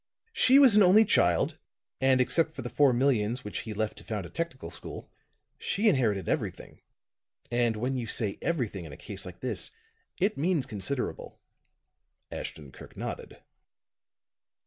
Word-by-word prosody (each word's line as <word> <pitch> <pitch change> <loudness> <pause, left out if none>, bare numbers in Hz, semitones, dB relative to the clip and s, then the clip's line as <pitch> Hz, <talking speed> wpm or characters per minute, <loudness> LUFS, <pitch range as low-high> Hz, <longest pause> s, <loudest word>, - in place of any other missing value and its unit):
She 265 -9 +6
was 265 -7 +8
an 210 - +7
only 200 +4 +7
child, 85 - +2 0.4
and 130 -1 +3
except 155 +5 +2
for 135 - -6
the 120 - -6
four 145 -3 +4
millions 120 -2 +1
which 105 - -4
he 110 - -6
left 110 0 -2
to - - -12
found 105 -5 -4
a 85 - -11
technical 130 - -5
school, - - -8 0.5
she 210 +4 0
inherited 115 - +2
everything. - - -3 0.7
And 120 -1 +1
when 125 +5 -2
you 115 - -4
say 105 -2 -2
everything 115 - -2
in 75 - -9
a - - -10
case - - -7
like - - -11
this, - - -3 0.5
it 195 -3 +1
means 160 -3 +1
considerable." 120 +3 -4 0.9
Ashton 75 -4 -7
Kirk - - -14
nodded. - - -7
125 Hz, 155 wpm, -28 LUFS, 105-165 Hz, 0.9 s, was